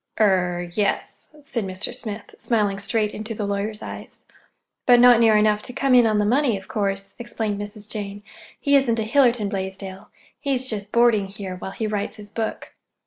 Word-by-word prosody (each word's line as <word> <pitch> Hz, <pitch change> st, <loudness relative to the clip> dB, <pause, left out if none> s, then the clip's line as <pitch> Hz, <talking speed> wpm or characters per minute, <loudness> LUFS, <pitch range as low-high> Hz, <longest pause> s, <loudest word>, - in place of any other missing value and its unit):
"Er—yes," 180 Hz, -1 st, 0 dB
said 270 Hz, -7 st, -2 dB
Mr. 190 Hz, +4 st, -4 dB
Smith, 220 Hz, -4 st, -7 dB
smiling 205 Hz, -4 st, +1 dB
straight 210 Hz, +1 st, 0 dB
into 220 Hz, +1 st, -5 dB
the 210 Hz, -, -3 dB
lawyer's 205 Hz, +1 st, -3 dB
eyes. -, -, -9 dB, 0.6 s
"But 245 Hz, -1 st, +7 dB
not 245 Hz, -1 st, +7 dB
near 225 Hz, -2 st, +5 dB
enough 210 Hz, 0 st, +3 dB
to 250 Hz, -, -6 dB
come 275 Hz, 0 st, +1 dB
in 245 Hz, -2 st, +7 dB
on 215 Hz, -1 st, +2 dB
the 210 Hz, -, +2 dB
money, 245 Hz, 0 st, +2 dB
of 195 Hz, -, -12 dB
course," 195 Hz, -3 st, -2 dB
explained 220 Hz, -3 st, -3 dB
Mrs. 205 Hz, 0 st, -5 dB
Jane. 205 Hz, -1 st, -5 dB, 0.4 s
"He 285 Hz, -1 st, +3 dB
isn't 255 Hz, -4 st, +3 dB
a 220 Hz, -, +1 dB
Hiller 245 Hz, +3 st, +4 dB
Blaisdell. 195 Hz, -3 st, -5 dB, 0.3 s
He's 265 Hz, -3 st, -1 dB
just 210 Hz, -3 st, -3 dB
boarding 235 Hz, -4 st, +4 dB
here, 195 Hz, -1 st, -7 dB
while 185 Hz, -, -6 dB
he 220 Hz, +3 st, -4 dB
writes 210 Hz, 0 st, -2 dB
his 210 Hz, -1 st, -10 dB
book." 225 Hz, -1 st, -4 dB
210 Hz, 180 wpm, -23 LUFS, 200-235 Hz, 0.6 s, But